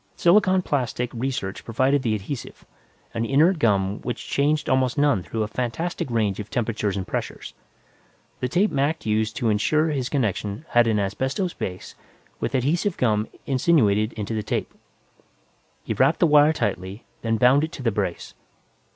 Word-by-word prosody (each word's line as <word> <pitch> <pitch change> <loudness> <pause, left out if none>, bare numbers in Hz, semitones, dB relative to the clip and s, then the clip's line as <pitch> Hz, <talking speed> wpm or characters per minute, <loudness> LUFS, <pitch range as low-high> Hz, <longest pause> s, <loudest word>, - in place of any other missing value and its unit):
Silicon 185 +1 +4
plastic 125 -4 -1
research 120 -6 -3
provided 130 +4 +1
the 110 -4 0
adhesive, 110 +6 -7 0.5
an 115 - -1
inert 155 +9 +3
gum 100 -5 +1
which 120 -2 -5
changed 150 +2 +1
almost 130 +1 +1
none 145 -9 +3
through 110 +5 -3
a - - -2
fantastic 125 +8 -3
range 110 -4 0
of 105 +1 -6
temperatures 105 -4 -1
and 95 - -3
pressures. - - -5 0.9
The 125 - -1
tape 195 +9 +2
Mac 145 +3 0
used 110 0 0
to 115 - 0
insure 155 +10 +2
his 135 -4 -2
connection 110 - -2
had 120 -1 +4
an 110 -2 +2
asbestos 130 - -1
base, 90 0 -6 0.5
with - - -2
adhesive 165 +9 0
gum 110 -3 +1 0.2
insinuated 120 -7 +2
into 110 0 -4
the 110 - -1
tape. - - -3 1.1
He - - -2
wrapped - - +2
the - - +5
wire 150 -1 +6
tightly, 95 - -3 0.2
then 115 -1 0
bound 125 +5 +5
it 160 - -2
to 130 - -7
the 115 - +2
brace. 100 -4 -3
120 Hz, 160 wpm, -24 LUFS, 105-145 Hz, 1.1 s, wire